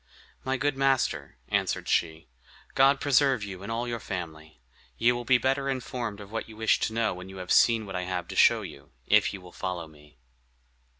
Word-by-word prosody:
"My 130 0 -1
good 145 +2 0
master," 135 -1 0
answered - - -1
she, 80 -2 0 0.5
"God 135 +1 +4
preserve 135 -4 +3
you 95 -3 -7
and 100 +3 -6
all 120 +2 -2
your 120 -1 -3
family. 80 - -7 0.4
You 120 +1 +4
will 120 0 -5
be 130 +1 +5
better 135 +2 0
informed 120 -5 -4
of 100 0 -11
what 115 0 -4
you 110 - -12
wish 110 0 +2
to 110 - -1
know 115 -1 +1
when 90 +1 -9
you 95 - -10
have 90 -1 -6
seen 115 -2 +4
what 95 -2 -7
I 90 - -1
have 90 -2 -3
to - - -6
show - - +5
you, - - -11
if 105 -1 +4
you 100 - -7
will 90 -1 -13
follow 90 -3 -4
me." 75 -2 -19
110 Hz, 205 wpm, -27 LUFS, 90-125 Hz, 0.5 s, be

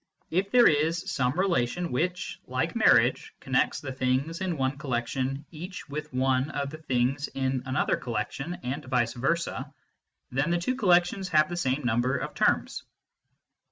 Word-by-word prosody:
If 190 +4 +1
there 240 +2 +6
is 165 +5 +1
some 125 +2 0
relation 175 -2 0
which, 180 +8 -2
like - - -1
marriage, - - +3
connects - - 0
the 135 - -5
things 130 +6 -1
in 180 -4 -1
one 135 +1 -1
collection 130 +1 -2
each 175 +3 -8
with 150 +1 -6
one 130 +1 +1
of 140 -1 -3
the 155 - -8
things 135 0 0
in 130 -1 -1
another 130 0 +1
collection, 130 +8 -3
and 135 +5 -3
vice 125 -2 +1
versa, 165 +8 -1 0.6
then 135 +5 0
the 175 - +2
two 175 +9 -1
collections 185 -4 +2
have 155 -2 +4
the 175 - -3
same 135 -4 0
number 120 +3 +1
of - - -5
terms. - - +1
145 Hz, 155 wpm, -27 LUFS, 130-170 Hz, 0.6 s, there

